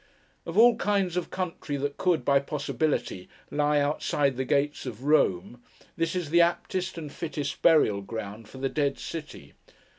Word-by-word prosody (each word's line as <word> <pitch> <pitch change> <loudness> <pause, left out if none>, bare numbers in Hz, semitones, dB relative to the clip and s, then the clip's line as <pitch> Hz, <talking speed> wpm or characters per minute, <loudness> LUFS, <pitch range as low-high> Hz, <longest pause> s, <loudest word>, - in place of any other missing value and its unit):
Of 165 +3 -4
all 235 +1 +7
kinds 195 -5 0
of 180 -2 -2
country 165 -5 -4
that 140 +1 -3
could, 180 -3 +1
by 140 -1 +4
possibility, 140 -8 -2 0.2
lie 150 0 +2
outside 145 -1 0
the 130 +1 -2
gates 145 +1 0
of 120 0 -7
Rome, 120 - +1 0.3
this 165 +2 -1
is 175 -5 -3
the 170 +1 +6
aptest 180 +2 0
and 155 -3 -6
fittest 150 -4 -4
burial 130 -12 +4
ground 110 +1 -7
for - - -12
the 135 +1 -1
Dead 140 0 0
City. 155 -2 -8
150 Hz, 160 wpm, -27 LUFS, 135-170 Hz, 0.3 s, all